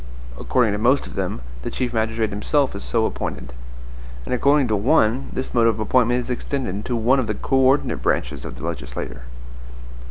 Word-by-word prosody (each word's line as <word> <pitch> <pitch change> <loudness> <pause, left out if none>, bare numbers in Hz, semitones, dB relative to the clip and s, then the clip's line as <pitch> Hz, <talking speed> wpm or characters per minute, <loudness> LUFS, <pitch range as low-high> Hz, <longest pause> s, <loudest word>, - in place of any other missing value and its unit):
According 120 - +1
to 105 - -2
most 125 +5 +3
of - - -10
them, - - -3 0.2
the - - -4
chief 125 -2 -3
magistrate 110 0 0
himself 130 +6 0
is 100 - -6
so 115 -2 +1
appointed. 60 - -4 0.7
And - - -2
according 140 +2 +3
to 110 - +2
one, 120 +2 +2
this 130 - -4
mode 115 -2 +4
of 110 -1 +1
appointment 120 +2 +2
is 125 - -5
extended 120 -6 -3
to 125 - -1
one 120 +4 +3
of 120 - -1
the 105 - -1
co 135 - 0
ordinate 135 +2 +3
branches - - -1
of - - -7
the 75 - -7
legislature. 65 -8 -5
115 Hz, 190 wpm, -22 LUFS, 105-130 Hz, 0.7 s, mode